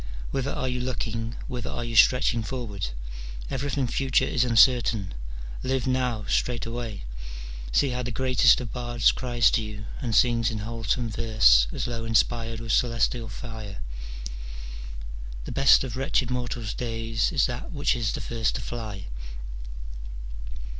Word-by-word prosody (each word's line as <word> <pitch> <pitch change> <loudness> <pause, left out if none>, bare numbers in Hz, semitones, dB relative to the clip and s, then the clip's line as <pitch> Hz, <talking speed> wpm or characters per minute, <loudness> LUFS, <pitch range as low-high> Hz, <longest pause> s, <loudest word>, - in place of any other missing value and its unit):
Whither 135 0 -1
are 130 - -1
you 125 0 -1
looking, 115 -2 -2
whither 125 -3 -4
are 120 - -3
you 115 -1 -4
stretching 125 0 +5
forward? 110 - -3 0.6
everything 140 0 0
future 130 +2 +2
is 125 - +2
uncer 125 +1 +6
tain': 100 -5 -2 0.5
live 130 -1 0
now 125 -4 0
straightway. 115 - -1 0.7
See 140 - +3
how 125 0 -1
the 125 - -3
greatest 130 +2 +4
of 120 - -6
bards 120 -1 +3
cries 120 -4 +2
to 115 - +2
you 105 -1 -6 0.2
and 115 -3 -1
sings 120 -2 +4
in 110 - -3
wholesome 115 +2 -1
verse 105 - +5
as - - -2
though 115 -1 -3
inspired 115 0 +1
with 115 0 -3
celestial 115 -1 +2
fire: 110 - -7 0.8
— - - -9
"The - - -5
best 135 -1 +6
of 130 -3 -4
wretched 130 -1 +1
mortals' 120 -3 -2
days 115 0 -1
is 140 -7 +3
that 120 -1 -4
Which 145 -4 +1
is 115 -4 0
the - - -3
first 115 -1 -1
to - - -2
fly." 110 -5 -5
115 Hz, 150 wpm, -27 LUFS, 110-125 Hz, 0.8 s, uncer